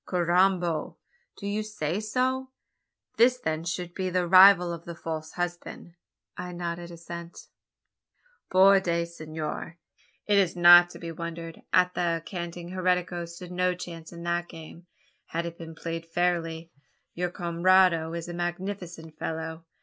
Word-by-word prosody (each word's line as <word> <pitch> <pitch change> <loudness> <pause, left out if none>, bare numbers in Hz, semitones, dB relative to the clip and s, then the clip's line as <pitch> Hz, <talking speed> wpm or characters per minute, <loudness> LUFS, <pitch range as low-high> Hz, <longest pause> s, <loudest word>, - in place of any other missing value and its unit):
"Carrambo! 175 -2 +1 0.4
Do - - -8
you 205 +1 -1
say 205 -5 -3
so? 255 +4 -1 0.7
This 250 +2 +5
then 160 -9 -3
should 175 0 -4
be 185 0 -2
the 180 -1 0
rival 185 -1 +7
of 170 -1 -8
the 170 - -7
false 160 -2 -6
husband?" 175 -1 -5 0.4
I 180 0 -6
nodded 175 0 -5
assent. 170 0 -9 1.0
"Por 195 +1 +6
Dios, 170 -2 -2
Senor; 155 +1 -5 0.5
it 205 -1 +4
is 185 -3 +1
not 175 0 +8
to - - -11
be 165 -1 -6
wondered 165 0 -7
at 180 0 +4
that 170 -1 0
the 165 0 -7
canting 175 -1 -6
heretico 180 -1 0
stood 175 +1 -10
no 180 0 +1
chance 165 -2 -9
in 170 -1 -9
that 175 0 -1
game 165 +2 -12 0.4
had 170 +1 -3
it 170 0 -7
been 165 -1 -9
played 165 0 -5
fairly. 165 -1 -1 0.4
Your 180 +1 -2
camarado 175 -1 +3
is 170 0 -5
a 175 - -6
magnificent 175 -2 -5
fellow. 160 0 -5
175 Hz, 150 wpm, -27 LUFS, 165-180 Hz, 1.0 s, not